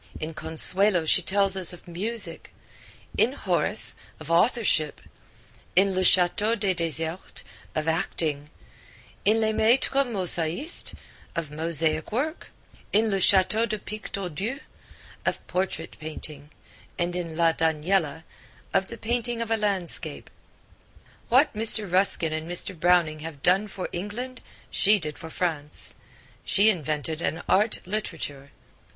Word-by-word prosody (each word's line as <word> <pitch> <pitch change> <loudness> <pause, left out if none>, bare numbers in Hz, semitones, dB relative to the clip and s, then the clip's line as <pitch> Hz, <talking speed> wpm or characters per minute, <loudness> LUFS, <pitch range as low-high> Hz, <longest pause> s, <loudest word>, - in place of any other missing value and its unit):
In 155 +1 -5
Consuelo 175 +3 +2
she 170 - +4
tells 195 +1 +2
us 185 -2 +4
of 175 - -14
music; 185 +1 -3 0.7
in - - +4
Horace - - +5 0.2
of - - -7
authorship; 170 - +2 0.8
in 195 +1 +4
Le 185 0 0
Chateau 185 +5 +4
des 195 -3 0
Desertes 165 0 -3 0.3
of 155 0 -2
acting; 155 -3 -2 0.8
in 215 +3 +4
Les 220 -1 +1
Maitres 260 +5 +2
Mosaistes 185 - +1 0.4
of 165 -4 -4
mosaic 160 +1 -1
work; 295 +9 -3 0.4
in 215 +1 +2
Le 195 - +1
Chateau 195 +4 +4
de 215 0 -2
Pictordu 200 - -5 0.6
of - - -2
portrait 180 -3 -3
painting; 155 -2 -8 0.5
and 175 -1 -1
in 165 -3 -5
La 165 -1 +4
Daniella 160 0 0 0.5
of 190 - +2
the 235 - -9
painting 235 +1 -2
of 230 -1 -3
landscape. 200 -6 -2 1.0
What 265 +5 +4
Mr. 220 0 +3
Ruskin 180 -3 +2
and 155 +1 -4
Mr. 175 +2 -2
Browning 170 -3 +3
have 150 -3 -9
done 190 +4 +3
for 190 -2 -5
England 230 +8 -6 0.3
she 210 +2 +4
did 150 -5 -6
for 160 - -8
France. 155 -4 -2 0.5
She 210 +3 +4
invented 155 -2 -3
an 160 - -2
art 210 +3 +1
literature. 165 -8 -5
180 Hz, 125 wpm, -25 LUFS, 160-210 Hz, 1.0 s, Horace